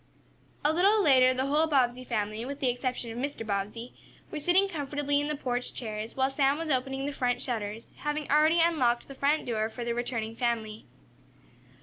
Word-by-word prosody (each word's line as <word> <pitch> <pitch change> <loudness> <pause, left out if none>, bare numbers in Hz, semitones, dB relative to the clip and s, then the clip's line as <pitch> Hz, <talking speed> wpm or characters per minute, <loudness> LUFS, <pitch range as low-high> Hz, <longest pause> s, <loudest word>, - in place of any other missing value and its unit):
A 300 - +4
little 400 +5 +4
later 255 -4 +6
the 260 +1 -1
whole 300 +3 +2
Bobbsey 255 -4 +1
family, 215 -2 -2
with 280 +3 -6
the 260 - +1
exception 245 -1 -3
of 230 - -6
Mr. 275 -4 -4
Bobbsey, 210 +4 -3 0.4
were 310 - -4
sitting 360 +6 +3
comfortably 290 -3 -1
in 290 - -2
the 300 - -1
porch 250 -3 -3
chairs, 220 -1 -5
while 265 0 +3
Sam 275 +1 +2
was 325 -1 -3
opening 270 +1 -1
the 290 - -3
front 245 -2 0
shutters, 225 -3 -4
having 295 0 -3
already 310 +3 +5
unlocked 280 -8 +2
the 275 - -9
front 285 +3 +1
door 220 -2 -1
for 240 +1 -6
the 235 - -1
returning 235 -2 -3
family. 225 -3 -2
255 Hz, 190 wpm, -29 LUFS, 235-290 Hz, 0.4 s, later